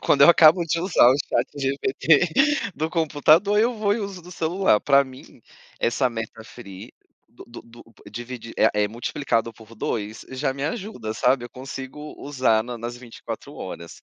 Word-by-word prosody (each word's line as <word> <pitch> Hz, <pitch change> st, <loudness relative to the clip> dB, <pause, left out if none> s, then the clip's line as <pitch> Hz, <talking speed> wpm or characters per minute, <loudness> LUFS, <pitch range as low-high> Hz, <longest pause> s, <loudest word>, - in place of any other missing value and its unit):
quando 140 Hz, -, +3 dB
eu 140 Hz, -, +8 dB
acabo 170 Hz, +1 st, +6 dB
de 165 Hz, +1 st, -1 dB
usar 175 Hz, -9 st, +4 dB
o 130 Hz, -, +4 dB
chat -, -, 0 dB
GPT 140 Hz, +2 st, +2 dB, 0.5 s
do 155 Hz, +1 st, -3 dB
computador, 165 Hz, +5 st, +3 dB
eu 240 Hz, +2 st, +2 dB
vou 210 Hz, -2 st, 0 dB
e -, -, -3 dB
uso 195 Hz, -3 st, -6 dB
do 180 Hz, +2 st, -12 dB
celular 170 Hz, -, +1 dB
para 140 Hz, -1 st, +4 dB
mim, 130 Hz, -1 st, -15 dB, 0.4 s
essa 125 Hz, +2 st, +1 dB
meta 115 Hz, -1 st, -7 dB
free 100 Hz, -5 st, -11 dB, 0.4 s
do -, -, -15 dB
do 120 Hz, -, -11 dB
do 115 Hz, 0 st, -16 dB, 0.3 s
dividi 120 Hz, +1 st, -8 dB
é -, -, +5 dB
é -, -, -2 dB
multiplicado 115 Hz, +1 st, -2 dB
por 110 Hz, 0 st, -16 dB
2, 110 Hz, 0 st, -4 dB
já 130 Hz, +1 st, -2 dB
me 140 Hz, +1 st, -4 dB
ajuda, 160 Hz, -, -4 dB
sabe, 125 Hz, +1 st, +1 dB
eu 120 Hz, -, -9 dB
consigo 135 Hz, +3 st, -8 dB
usar 130 Hz, -6 st, +1 dB
na 120 Hz, 0 st, -7 dB
nas 120 Hz, +1 st, -6 dB
24 115 Hz, -7 st, -9 dB
135 Hz, 170 wpm, -23 LUFS, 115-160 Hz, 0.5 s, eu